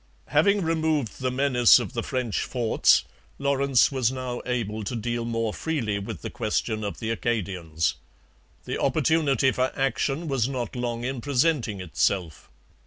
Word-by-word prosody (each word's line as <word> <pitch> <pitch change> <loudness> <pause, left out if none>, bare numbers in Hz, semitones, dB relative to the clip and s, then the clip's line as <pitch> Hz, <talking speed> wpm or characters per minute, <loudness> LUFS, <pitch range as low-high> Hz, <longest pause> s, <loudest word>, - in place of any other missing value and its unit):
Having 200 +7 +3
removed 160 -7 0
the 130 - +1
menace 125 -2 +5
of - - -4
the 120 - -1
French 125 -3 -2
forts, 120 -3 +3 0.3
Lawrence 140 -2 +3
was 130 -3 +1
now 130 -2 -4
able 110 -3 -2
to 120 - -4
deal 120 +1 -2
more 115 -2 -1
freely 115 -11 -2
with 100 -4 -7
the - - -5
question 110 -1 -2
of 100 - -4
the 110 0 -2
Acadians. 90 -9 -1 0.7
The - - -3
opportunity 140 -5 +2
for 130 0 0
action 135 +4 -1
was 135 -4 0
not 125 -4 -4
long 120 -1 -3
in 130 0 -3
presenting 135 -6 +1
itself. 90 -1 -1
125 Hz, 150 wpm, -25 LUFS, 110-135 Hz, 0.7 s, menace